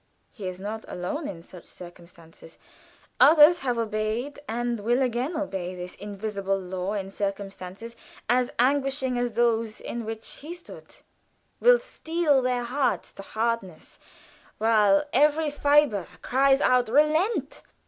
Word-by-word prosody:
He 200 -5 -7
is 185 0 -6
not 215 +3 -5
alone 285 - -4
in 165 -3 -8
such 180 0 -13
circumstances. 170 -2 -14 0.6
Others 320 +2 +7
have 250 -5 -1
obeyed 225 +5 -2
and 235 +1 -2
will 235 +5 +1
again 255 +5 -1
obey 190 - -4
this 180 0 -7
invisible 200 -1 -3
law 185 +1 -4
in 195 -2 -4
circumstances 195 +2 -5 0.3
as 245 +1 +2
anguishing 265 0 +1
as 245 -1 -1
those 230 -1 +1
in 235 - -5
which 225 0 -7
he 320 +5 -8
stood, 350 - -13 0.6
will - - +6
steel 325 - 0
their 250 -1 0
hearts 255 +1 -1
to - - -10
hardness 220 -5 -4 0.6
while 210 -3 +4
every 300 +3 +3
fiber 285 - +2 0.2
cries 270 +1 +3
out, 250 -2 +3
"Relent!" 305 - +1
235 Hz, 130 wpm, -26 LUFS, 195-275 Hz, 0.6 s, Others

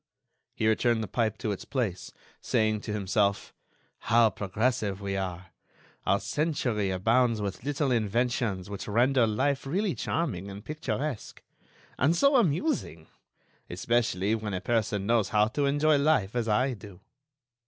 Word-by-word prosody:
He 110 - 0
returned 110 +1 +2
the - - -4
pipe 110 +2 -1
to 110 - -2
its 100 - -5
place, 110 -10 -3 0.3
saying 110 -1 +1
to 105 - -6
himself: 100 0 0 0.5
"How 115 -1 +4
progressive 105 0 -1
we 100 -1 -3
are! 90 -1 -4 0.6
Our - - +3
century 130 -10 -1
abounds 115 +5 +2
with 100 +1 -4
little 145 0 -1
inventions 115 -3 0
which 100 -1 -6
render 120 +3 +3
life 135 +6 0
really 190 +5 0
charming 110 - -2
and 100 +1 -9
picturesque. 150 -4 -4 0.6
And 150 +6 +3
so 280 +8 +4
amusing!... 170 - 0 0.6
especially 105 0 0
when 105 -3 -2
a - - -2
person 105 -1 0
knows 115 -4 +2
how 105 +3 +3
to 140 +4 0
enjoy 145 +1 +3
life 140 -9 +2
as 120 -2 0
I 125 +5 +2
do." 100 -4 -12
110 Hz, 145 wpm, -28 LUFS, 100-135 Hz, 0.6 s, How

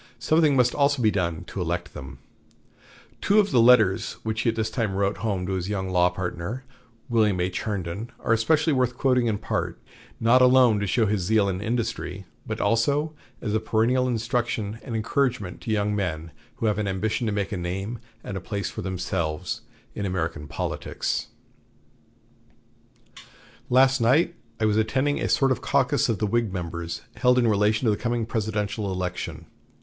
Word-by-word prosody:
Something 155 +2 +3
must 125 -2 +3
also 140 -1 +2
be 110 -3 +3
done 85 -4 -1
to 95 - -6
elect 85 0 -3
them. 65 - -9 1.0
Two 205 - +3
of 205 -2 +2
the 120 - +5
letters 110 -4 +5
which 110 0 -1
he 120 - +2
at 115 - -1
this 110 -1 -1
time 110 -6 -1
wrote 100 +1 0
home 100 -5 -2
to 95 - -3
his 95 0 -2
young 95 -2 -2
law 90 0 +4
partner, 90 +6 -4 0.4
William 105 -5 +2
H. 90 +1 -1
Herndon, 100 +1 -4
are 115 - +1
especially 150 +8 +2
worth 125 -2 +1
quoting 125 -3 +2
in 110 -2 0
part, - - -3 0.4
not 120 +3 +5
alone 125 -4 +6
to 105 - -1
show 115 +4 +2
his 100 -3 0
own - - -3
zeal 105 -2 +3
and 95 0 -3
industry, 110 -4 -3 0.2
but - - -3
also 145 +7 +1 0.3
as 105 - -2
a 110 - +2
perennial 115 +4 +1
instruction 115 -2 -1
and 120 - -5
encouragement 110 -3 -1
to 120 - -7
young 105 -1 +1
men 85 -5 -3 0.2
who - - -3
have 105 -1 +1
an 105 - -1
ambition 105 +4 -1
to - - 0
make 100 -1 -2
a - - -2
name 95 +6 -4 0.2
and 100 - -6
a 95 - -4
place 100 +1 -3
for - - -6
themselves 85 -4 -3 0.3
in 105 - -4
American 80 -5 -3
politics: - - -3 2.4
"Last 130 +1 +4
night 150 +9 +3 0.3
I 110 - +2
was 105 0 +2
attending 130 +6 +1
a - - -1
sort 135 -1 +3
of 130 - 0
caucus 140 -1 +2
of 115 - +1
the 105 - 0
Whig 115 0 0
members, 85 -2 -5
held 125 0 +4
in 120 -2 +3
relation 105 +2 +2
to 110 - +4
the 105 - 0
coming 120 -2 0
presidential 105 -2 -2
election. 90 -3 -4
110 Hz, 180 wpm, -25 LUFS, 95-120 Hz, 2.4 s, alone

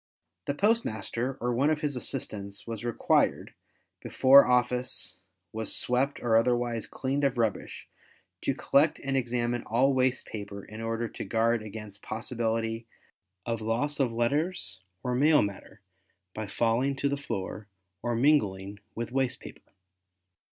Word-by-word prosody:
The 140 - 0
postmaster, 135 - 0
or 120 +1 0
one 135 +5 +2
of 155 -1 0
his 145 -3 -1
assistants, 100 -4 -4
was 115 -1 -5
required, 120 -1 +1 0.5
before 135 +1 +6
office 125 0 +1 0.3
was 110 -1 -2
swept 130 +3 0
or 115 -2 +2
otherwise 120 -1 +1
cleaned 140 +2 -2
of 135 -2 +2
rubbish, 110 -5 -2 0.5
to - - 0
collect 150 +2 +3
and 135 0 -1
examine 120 -1 0
all 130 +5 +2
waste 130 0 +1
paper 100 -2 -7
in 110 +1 -9
order 115 +1 -2
to - - -6
guard 115 0 +1
against 105 -1 -8
possibility 115 0 -2 0.6
of 115 -1 -2
loss 120 +7 -1
of 130 -4 +2
letters 120 - -1 0.2
or 125 - -1
mail 150 +4 +5
matter 100 -1 -7 0.5
by 110 -1 -4
falling 120 +6 +1
to 140 - 0
the 140 - 0
floor 110 -6 -5 0.3
or 120 -1 -1
mingling 105 -7 +2 0.2
with 115 +1 -4
waste 130 -1 0
paper. - - -13
120 Hz, 140 wpm, -28 LUFS, 110-135 Hz, 0.6 s, before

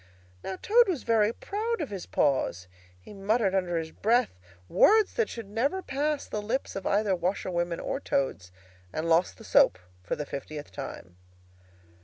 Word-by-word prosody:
Now 190 - -4
Toad 475 +3 +5
was 350 -8 -1
very 220 -2 +3
proud 435 - -3
of 300 -9 -4
his 195 -3 -6
paws. 110 - +1 0.3
He 90 - -13
muttered 200 0 +1
under 180 -3 0
his 160 -1 -3
breath 235 +6 +2 0.4
words 430 - +5
that 460 - 0
should 230 -3 -7
never 270 - -1
pass 290 +1 -1
the 210 - -4
lips 230 +6 -2
of 195 - -3
either 205 -1 +2
washerwomen 175 -1 -1
or 270 - -3
Toads; 130 - -1 0.4
and 155 +1 -3
lost 165 - +2
the - - -13
soap, - - +4 0.2
for 90 - -3
the 150 - -4
fiftieth 145 +1 -7
time. 90 -10 -8
200 Hz, 165 wpm, -28 LUFS, 165-265 Hz, 0.4 s, Toad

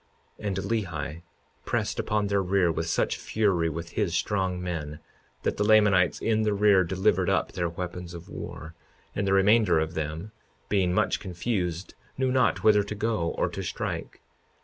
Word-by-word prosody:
52:36 105 - -3
And 95 -2 -2
Lehi 90 -6 -3 0.4
pressed - - -1
upon 105 -1 0
their 100 -1 +1
rear 95 -2 +2
with - - -2
such - - 0
fury 95 -7 +1
with 85 +2 -5
his 90 -2 -1
strong 95 -3 0
men, 80 -5 -4 0.5
that - - -1
the 105 - +1
Lamanites 105 -6 +4
in 110 -1 +1
the 105 -1 +1
rear 100 -2 +5
delivered 95 +1 +1
up - - +1
their 85 -1 -2
weapons 90 0 -6
of 85 0 -10
war; 80 +1 -8 0.4
and 100 -1 -1
the 95 - +2
remainder 100 -1 +4
of 80 +1 -1
them, 80 +5 -4 0.4
being 95 -3 +2
much 100 +2 +1
confused, 90 -1 -3 0.2
knew 130 -1 +1
not 130 -3 +2
whither 105 -1 +6
to 105 +1 -5
go 105 -6 -1
or - - +2
to - - -5
strike. - - -4
95 Hz, 170 wpm, -27 LUFS, 85-105 Hz, 0.5 s, whither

